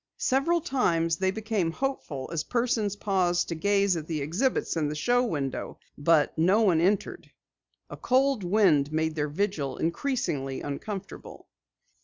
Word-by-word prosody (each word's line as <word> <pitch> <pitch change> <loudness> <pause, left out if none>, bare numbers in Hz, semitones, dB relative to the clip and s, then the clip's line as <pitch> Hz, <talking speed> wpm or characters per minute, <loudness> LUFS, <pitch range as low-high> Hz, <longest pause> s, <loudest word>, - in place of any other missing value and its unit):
Several 285 +6 +1
times 165 - +1
they 190 +1 +1
became 210 -3 -1
hopeful 165 - -4
as 160 -2 -1
persons 230 -3 0
paused 185 -4 0
to - - -1
gaze 200 +2 +2
at 160 -2 -5
the 160 -2 -2
exhibits 175 - -1
in 155 -3 0
the 150 - -4
show 245 +10 +2
window, 145 - -3 0.2
but 150 0 +2
no 185 +7 +3
one 180 -7 +3
entered. 195 +3 -1 0.6
A - - -9
cold 260 -3 +2
wind 175 -7 +3
made 160 0 0
their 150 -1 -2
vigil 150 -6 -2
increasingly 160 - -2
uncomfortable. 190 +8 -7
180 Hz, 145 wpm, -27 LUFS, 155-220 Hz, 0.6 s, no